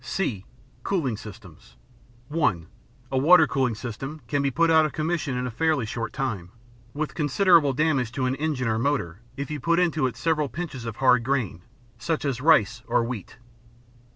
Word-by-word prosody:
(c) 120 - -2 0.4
Cooling 155 - -1
Systems 105 -5 -13 0.5
(1.) 145 - 0 0.5
A 135 - 0
water 160 +3 +7
cooling 130 -3 0
system 135 +7 -6
can 145 -1 0
be 140 - +1
put 165 +5 +2
out 160 -1 +6
of 155 - -2
commission 155 -4 -2
in 125 - -2
a 125 - -3
fairly 155 0 +1
short 115 +1 -4
time, 105 - -3 0.4
with 150 +3 -4
considerable 160 0 +4
damage 135 -4 +1
to 130 -1 -1
an 130 - +1
engine 145 -5 -1
or 110 0 0
motor, 115 -10 -1 0.2
if 140 +2 -4
you 150 - -3
put 170 +5 +1
into 165 -6 +2
it 115 -2 -7
several 155 -2 0
pinches 150 -8 -6
of 115 -2 -5
hard 125 -3 +4
grain, 120 -10 -1 0.4
such 160 -3 -2
as 130 -3 -2
rice 125 -7 +3
or - - +2
wheat. 115 -4 -6
135 Hz, 180 wpm, -25 LUFS, 115-155 Hz, 0.5 s, water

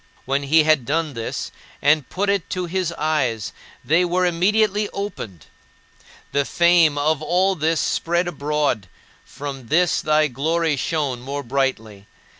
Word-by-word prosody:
When 135 +2 0
he 155 +3 +4
had 155 -4 +3
done 155 +3 -1
this, 115 -2 -5 0.3
and 145 -2 +2
put 200 +2 -2
it 200 -3 0
to 180 -1 -2
his 180 0 -2
eyes, 140 -10 -1 0.3
they 165 +4 +3
were 180 +1 +1
immediately 205 +4 +2
opened. 115 - -6 0.9
The 140 - +1
fame 170 -1 +3
of 150 +1 +1
all 185 +4 +2
this 160 -2 0
spread 175 +2 0
abroad; 145 - -1 0.4
from 135 -4 -8
this 175 +6 +2
thy 155 0 +3
glory 155 +4 0
shone 140 -3 -2
more 140 +3 -5
brightly. 115 -6 -2
155 Hz, 140 wpm, -21 LUFS, 140-175 Hz, 0.9 s, he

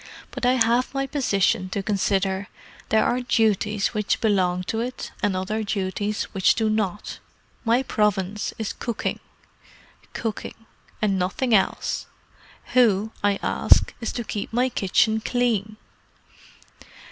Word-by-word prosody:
"But 245 - -1
I 250 - +5
have 240 +2 +2
my 275 0 0
position 200 -9 +1
to 195 +1 -3
consider. 195 -1 0 0.4
There 220 - +3
are 250 - +1
duties 215 -4 +1
which 210 -2 0
belong 185 -4 +1
to 220 +4 -2
it, 250 +2 -4
and 205 -2 +1
other 205 +4 -2
duties 205 0 -2
which 190 -2 +3
do 220 -1 +1
not. 210 -2 -2 0.4
My 240 +2 +3
province 210 -3 0
is 220 -2 -3
cooking. 235 -3 -3 0.9
Cooking. 225 0 -5 0.4
And 195 -3 +2
nothing 225 +7 0
else. 195 -3 +1 0.7
Who, 220 -4 +4
I 205 -1 +3
ask, - - +4
is 225 - -2
to 240 - -3
keep 210 -2 -5
my 250 +3 +2
kitchen 220 +1 +2
clean?" 220 -3 0
215 Hz, 130 wpm, -24 LUFS, 195-230 Hz, 0.9 s, I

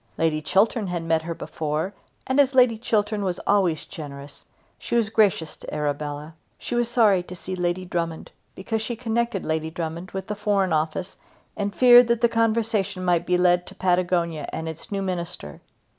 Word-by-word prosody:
Lady 160 -1 +1
Chiltern 200 +6 +2
had 175 -2 -3
met 165 -1 +1
her 165 +1 -5
before, 155 +6 -3 0.3
and 260 +1 +1
as 275 -1 +4
Lady 250 -3 +5
Chiltern 215 -2 0
was 185 -2 -1
always 185 -6 +2
generous, 145 -4 -10 0.3
she - - -3
was 230 -2 +2
gracious 205 -8 +2
to - - -10
Arabella. 150 +1 -3 0.2
She - - -6
was 240 -1 +1
sorry 215 -6 +4
to 180 +1 -10
see 185 +1 -6
Lady 180 +1 -1
Drummond, 170 -2 -3 0.2
because 220 +3 -3
she 235 +2 -3
connected 230 -3 -1
Lady 160 0 -1
Drummond 165 +2 -5
with 190 0 -5
the 210 - -3
Foreign 200 -4 +1
Office 155 +4 -2 0.4
and 200 -1 -3
feared 245 -1 +8
that 235 -1 +1
the 235 - +4
conversation 220 -4 0
might 175 -1 +1
be 180 - +3
led 180 0 +3
to 195 - -11
Patagonia 175 -4 0
and 160 - -4
its 160 +4 -8
new 195 -1 -1
minister. 170 - -5
185 Hz, 180 wpm, -24 LUFS, 165-215 Hz, 0.4 s, feared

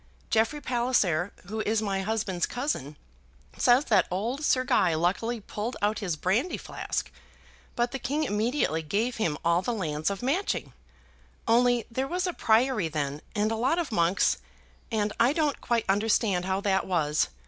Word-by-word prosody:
Jeffrey 225 +6 +2
Palliser, 235 - +1
who 215 +4 -5
is 220 0 +1
my 200 -3 -1
husband's 195 -4 -1
cousin, 245 - -3 0.6
says 250 +4 +4
that 200 -5 +3
old 230 +11 -2
Sir 255 -3 +3
Guy 180 -9 +2
luckily 200 +8 0
pulled 215 +4 -5
out 210 +1 0
his 185 -7 -2
brandy 215 - 0
flask. - - -4 0.6
But 240 0 0
the 270 - -4
king 290 +5 -1
immediately 215 - 0
gave 215 +10 -1
him 165 -9 0
all 170 +1 +3
the 235 +5 -2
lands 155 -5 -1
of 200 +3 -5
Matching, 325 +11 -1 0.7
only 240 0 +3
there 260 +3 -1
was 360 +4 -1
a 360 - -1
priory 225 - +2
then 150 -2 -3
and 210 +1 +1
a - - 0
lot 260 +9 +1
of 335 -7 -2
monks, 175 0 +2 0.5
and 210 -2 0
I 240 +4 +4
don't 300 -3 0
quite 235 -2 0
understand 200 -2 +2
how 190 +1 -1
that 195 -1 +1
was. 155 -5 +1
220 Hz, 165 wpm, -27 LUFS, 185-245 Hz, 0.7 s, says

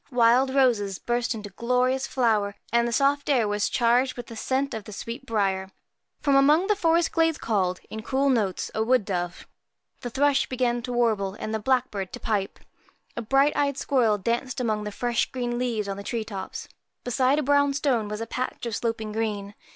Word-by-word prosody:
Wild 250 +2 +4
roses 220 -8 +2
burst 240 +2 -1
into 205 -2 -8
glorious 250 +5 0
flower, 215 -5 +1 0.2
and 235 0 +3
the - - -2
soft 280 +3 +1
air 245 -6 +3
was 205 0 0
charged 245 +2 +2
with 245 - -6
the 230 - -10
scent 265 +4 -1
of 220 -2 -5
the - - -9
sweet 235 +6 -7
briar. 195 -3 0 0.5
From 280 -2 +2
among 295 +6 +5
the 420 +1 +2
forest 335 -3 +2
glades 325 -1 +2
called, 185 -5 0
in 220 - -6
cool 270 +4 0
notes, 215 -8 0
a 220 - -1
wood 240 -1 +2
dove. 175 -3 -3 0.5
The 245 - -5
thrush 280 +3 +2
began 245 -2 0
to 250 - -5
warble, 220 -5 +1
and 215 - -4
the 220 - 0
blackbird 215 -5 0
to - - -6
pipe. 205 -3 -2 0.6
A 235 - -3
bright 270 +5 +3
eyed 280 -2 +1
squirrel 240 -8 +2
danced 235 +6 -2
among 215 -3 -1
the 210 - -4
fresh 240 +2 -1
green 240 -1 -2
leaves 230 -5 -1
on 195 0 -4
the 200 - -7
tree 230 +2 -2
tops. 200 -3 -6 0.4
Beside 255 +3 +2
a 305 - +1
brown 285 +1 +3
stone 250 -7 +1
was 210 +1 -5
a - - -2
patch 250 +1 -4
of 230 -3 -2
sloping 220 -2 -2
green. 210 -2 -3
235 Hz, 195 wpm, -25 LUFS, 210-265 Hz, 0.6 s, among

